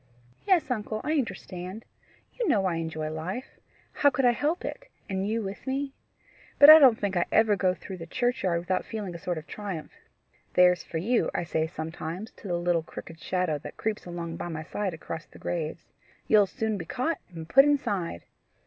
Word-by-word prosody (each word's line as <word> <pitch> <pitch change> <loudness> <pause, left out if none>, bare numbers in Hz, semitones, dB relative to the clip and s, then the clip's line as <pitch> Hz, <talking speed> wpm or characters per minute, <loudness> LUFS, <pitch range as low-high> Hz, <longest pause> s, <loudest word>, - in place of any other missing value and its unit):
"Yes, 355 -8 +3
uncle; 215 -2 -2
I 305 - -1
understand. 200 - -4 0.5
You 480 -3 -2
know 205 - +3
I 175 -3 0
enjoy 160 -1 -3
life: 185 +11 -5 0.3
how 285 - +4
could 265 -1 0
I 245 - +7
help 300 +8 -1
it - - -6 0.2
and 190 0 -2
you 225 +1 -1
with 195 +6 -7
me? 270 +1 -2 0.6
But 290 +1 +11
I 315 - +11
don't 255 -6 +7
think 200 -2 -1
I 175 - +2
ever 220 -2 +4
go 185 -1 +1
through 190 0 -8
the 165 -1 -8
churchyard 245 -6 0
without 185 +1 -1
feeling 210 -5 -5
a 170 - -7
sort 175 0 -3
of 155 - -7
triumph. 195 -7 -6 0.6
'There's 180 -1 +6
for 165 - -5
you!' 225 +9 +1
I - - 0
say 160 -1 -1
sometimes 160 +5 -6
to - - -10
the 175 -2 0
little 175 -1 +1
crooked 160 0 -10
shadow 180 -5 -1
that - - -10
creeps 215 -4 -3
along 170 -1 -5
by - - -4
my 160 -2 -5
side 190 +1 -3
across 160 0 -7
the - - -16
graves. 165 -1 -4 0.4
'You'll 210 -2 +5
soon 220 +1 -2
be 165 - -5
caught 275 - -1
and 165 -3 -8
put 270 +10 +7
inside! 200 - 0
190 Hz, 195 wpm, -28 LUFS, 170-240 Hz, 0.6 s, But